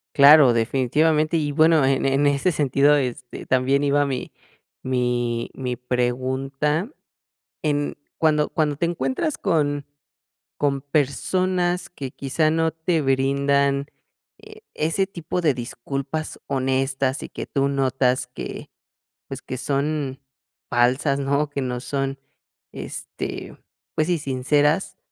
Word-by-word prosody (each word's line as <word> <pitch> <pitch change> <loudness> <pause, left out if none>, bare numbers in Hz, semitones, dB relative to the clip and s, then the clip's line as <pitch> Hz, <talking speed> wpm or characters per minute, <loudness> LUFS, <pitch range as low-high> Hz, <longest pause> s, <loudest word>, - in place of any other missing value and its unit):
Claro, 140 -3 +8
definitivamente. 150 +7 +2
Y 150 -2 -1
bueno, 155 -1 +4
en 135 0 +1
en 135 +2 +2
ese 145 +6 +2
sentido, 145 -1 +3
este, 125 -1 -4
también 130 +2 +2
iba 145 0 +3
mi 130 -2 -4 0.5
mi 120 -2 -1
mi 125 -2 -3
pregunta. 130 - -1 0.7
En 145 -2 0 0.2
cuando 150 -2 +2
cuando 150 -2 0
te 170 - 0
encuentras 165 - -1
con 145 -6 0 0.7
con 140 -2 0
personas 175 +6 0
que 135 -7 -7
quizá 155 +3 0
no 160 0 +1
te 160 0 0
brindan 140 +1 +1 0.5
e 430 0 -14
ese 165 +5 0
tipo 180 -1 -4
de 150 -5 +3
disculpas 135 +5 -5
honestas 135 0 0
y - - -7
que - - -7
tú 140 -1 0
notas 130 -2 +1
que, 125 - -7 0.6
pues, 135 -1 -7
que 130 - -6
son 140 0 -2 0.5
falsas, 130 +4 +2
¿no? 140 +2 0
Que 140 -1 -3
no 125 -1 -2
son, 135 0 -2 0.5
este, - - -6 0.4
pues 155 - +1
sí 175 -2 +2
sinceras, 145 +5 +1
140 Hz, 120 wpm, -23 LUFS, 130-155 Hz, 0.7 s, Claro